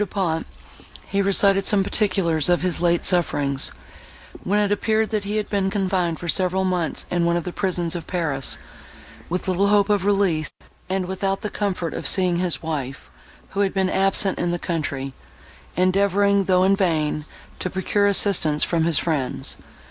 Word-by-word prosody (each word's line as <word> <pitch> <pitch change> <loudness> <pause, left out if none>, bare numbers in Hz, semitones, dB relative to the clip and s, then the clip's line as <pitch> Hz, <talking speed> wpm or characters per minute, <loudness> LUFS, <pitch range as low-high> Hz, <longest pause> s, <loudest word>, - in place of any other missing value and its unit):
Du 210 - 0
Pont 170 - -2 0.6
he 200 0 0
recited 195 0 +4
some 195 -1 +3
particulars 185 -7 +1
of 175 0 +2
his 180 -2 0
late 170 -1 +1
sufferings, 145 -7 +1 0.7
when 205 +3 +1
it 205 -1 +1
appeared, 220 +1 0
that 210 -2 -2
he 210 +2 -2
had 210 - -2
been 195 -2 0
confined 185 -4 -1
for 175 - -7
several 185 +2 +2
months 180 -3 -2
in 175 -1 +1
one 170 0 +1
of 170 - -3
the 180 - -6
prisons 175 -3 -1
of 170 - -6
Paris, 150 -7 -1 0.7
with 180 +3 -3
little 190 +2 +1
hope 205 0 +3
of 205 -3 +1
release, 195 -6 +1 0.4
and 190 0 -1
without 195 +1 -2
the 210 - -4
comfort 185 -5 -3
of - - -4
seeing 180 -3 +2
his 180 -2 -2
wife, 140 - -5 0.4
who 200 - -5
had 200 -1 0
been 190 -1 +1
absent 195 0 +2
in 175 - 0
the 175 - -1
country, 145 -6 -4 0.6
endeavouring, 200 +2 +2
though 185 -1 +3
in 195 +1 +4
vain, 155 -6 -1 0.3
to 185 - -2
procure 195 +2 0
assistance 185 -7 +3
from 165 -2 +1
his 170 -2 +4
friends. 145 -6 -2
185 Hz, 175 wpm, -22 LUFS, 170-200 Hz, 0.7 s, recited